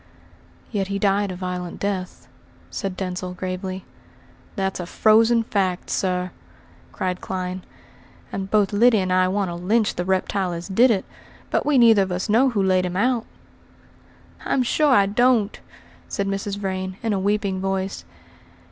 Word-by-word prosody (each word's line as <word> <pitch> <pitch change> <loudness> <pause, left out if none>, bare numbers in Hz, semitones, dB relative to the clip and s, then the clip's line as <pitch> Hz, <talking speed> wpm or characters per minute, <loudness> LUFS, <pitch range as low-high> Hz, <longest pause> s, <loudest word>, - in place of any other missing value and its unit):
"Yet 195 -2 -1
he 200 0 -2
died 200 0 +1
a - - -5
violent 180 -1 -5
death," 190 -2 -4 0.4
said 195 -3 -4
Denzil 180 -1 -4
gravely. 185 +1 -5 0.7
"That's 190 -2 -2
a 175 - -5
frozen 225 +4 +4
fact, 190 -4 -1
sir," 180 -1 -1 0.6
cried 185 -1 -3
Clyne, 185 0 -4 0.7
"and 195 0 -4
both 205 -1 +2
Lyddy 230 +2 +5
and 185 -2 0
I 185 0 +4
want 195 0 0
to - - -4
lynch 205 +6 +1
the 175 - -3
reptile 190 0 0
as 170 0 -6
did 230 +6 +4
it; 205 -5 +1 0.5
but - - 0
we 295 -2 +4
neither 230 -4 +6
of 190 -1 -1
us 180 +4 -2
know 245 +6 +4
who 210 -5 0
laid 185 -1 +2
him 180 +1 -4
out." 235 +2 +1 1.2
"I'm 260 - +1
sure 300 +5 +2
I 205 -6 +5
don't," 220 0 +2 0.5
said 200 - -2
Mrs. 195 0 -3
Vrain 190 -1 -3
in 225 -2 0
a 195 - 0
weeping 200 -1 0
voice. 195 0 -2
195 Hz, 160 wpm, -23 LUFS, 185-210 Hz, 1.2 s, neither